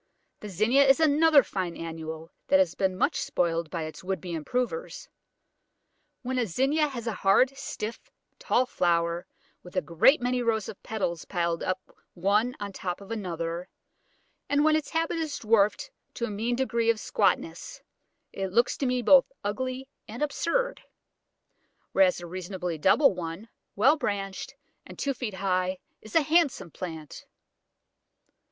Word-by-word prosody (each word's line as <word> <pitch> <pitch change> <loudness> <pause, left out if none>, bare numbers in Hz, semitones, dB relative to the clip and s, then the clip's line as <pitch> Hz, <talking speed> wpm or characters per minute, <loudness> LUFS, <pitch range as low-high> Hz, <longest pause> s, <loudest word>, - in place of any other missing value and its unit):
The 210 - -8
Zinnia 220 +9 +4
is 270 +3 +5
another 310 -1 +5
fine 185 -5 -4
annual 160 0 -7 0.2
that 190 - +5
has 185 -3 +3
been 190 -1 -1
much - - +1
spoilt 165 -2 -1
by 165 -1 -3
its 155 +3 -8
would 190 +1 -2
be 180 -2 -6
improvers. 250 - -3 1.2
When 255 +1 -1
a 235 - 0
Zinnia 275 - +2
has 245 -5 -6
a 230 - -1
hard, 225 +8 +3
stiff, 225 -4 -6 0.3
tall 475 - +2
flower, 170 -5 0 0.3
with 180 - -14
a 185 - +2
great 175 - +4
many 250 0 0
rows 220 -3 0
of 195 - -9
petals 190 -7 -3
piled 170 -2 -1
up 185 0 -4 0.2
one 210 +7 +1
on 200 -1 -5
top 180 -1 -4
of 200 +2 -12
another, 170 -4 -4 0.8
and 290 +1 +3
when 310 0 +5
its 310 -1 -1
habit 330 +1 -1
is 315 -3 -3
dwarfed 215 -2 +2 0.2
to 235 - -2
a 225 - -5
mean 225 +4 -1
degree 235 -3 0
of 230 - +3
squatness, - - -1 0.5
it 195 0 -2
looks 235 +5 +2
to 275 - -1
me 250 -1 0
both 270 +3 +6
ugly 255 +5 -3 0.2
and 230 +6 -4
absurd, 485 - -1 1.1
whereas 190 -2 +4
a 175 - -8
reasonably 180 -1 -5
double 200 - +5
one, 180 +4 -6 0.3
well 265 +10 +5
branched, 195 -7 -3 0.3
and - - -12
two 280 - -1
feet 230 -6 -5
high, 185 -1 0 0.2
is 215 - -12
a 325 - +5
handsome 285 - +2
plant. 160 -4 -8
210 Hz, 155 wpm, -27 LUFS, 180-260 Hz, 1.2 s, both